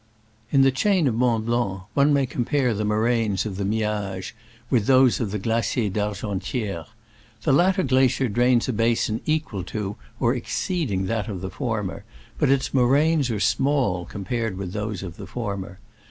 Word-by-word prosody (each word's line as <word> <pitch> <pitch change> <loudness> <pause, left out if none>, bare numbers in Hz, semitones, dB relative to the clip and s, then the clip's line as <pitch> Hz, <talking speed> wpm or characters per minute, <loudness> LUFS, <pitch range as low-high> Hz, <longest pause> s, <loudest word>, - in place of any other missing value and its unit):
In 135 -1 +5
the 135 - +5
chain 185 +5 +2
of 125 - +1
Mont 115 -1 +1
Blanc 115 -5 -1
one 140 +1 +4
may 140 -2 +3
compare 125 0 0
the 105 +1 -2
moraines 110 -1 +1
of 100 -3 -4
the 100 - -2
Miage 105 -2 -2 0.4
with 115 -5 +2
those 130 -2 +5
of 115 - -1
the 105 - -2
Glacier 115 +1 0
d'Argenti^re. 105 - -3 0.6
The - - +3
latter 185 +5 +3
glacier 130 -1 +3
drains 120 +2 +2
a 130 - -1
basin 115 0 +1
equal 155 - -1
to 100 +1 -4 0.2
or 120 0 +2
exceeding 125 - -2
that 110 +1 -2
of 95 -5 -5
the 95 -1 -5
former, 105 -2 -3 0.4
but 150 - +3
its 135 -1 +1
moraines 140 +3 +3
are 110 -3 -1
small 115 -6 +1
compared 110 0 -3
with 95 -2 -5
those 105 -2 -3
of 85 -3 -8
the - - -8
former. 100 -6 -5
115 Hz, 170 wpm, -24 LUFS, 100-130 Hz, 0.6 s, In